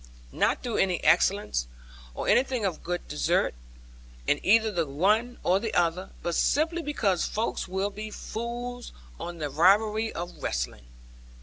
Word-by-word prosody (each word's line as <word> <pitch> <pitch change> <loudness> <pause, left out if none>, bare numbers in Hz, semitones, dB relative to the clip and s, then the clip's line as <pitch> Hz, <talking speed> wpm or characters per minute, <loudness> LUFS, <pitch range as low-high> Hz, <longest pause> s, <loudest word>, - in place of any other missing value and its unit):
Not - - +1
through 240 -3 -2
any 185 -3 +1
excellence, 175 - +3 0.5
or - - -4
anything 255 -4 +2
of 180 -5 -2
good 175 +1 -4
desert, 150 - +1 0.7
in 145 - +2
either 220 +2 +4
the 170 -5 -1
one 210 - +1
or 185 +2 +3
the 220 +1 -3
other, 175 +2 +1
but 170 - -1
simply 325 - +2
because 215 - 0
folks 220 -1 -2
will 190 +2 -1
be 215 +1 -6
fools 240 +3 -6 0.3
on 175 0 -6
the 150 -3 -3
rivalry 210 +8 +3
of 175 +1 -7
wrestling. - - -3
195 Hz, 145 wpm, -27 LUFS, 170-225 Hz, 0.7 s, either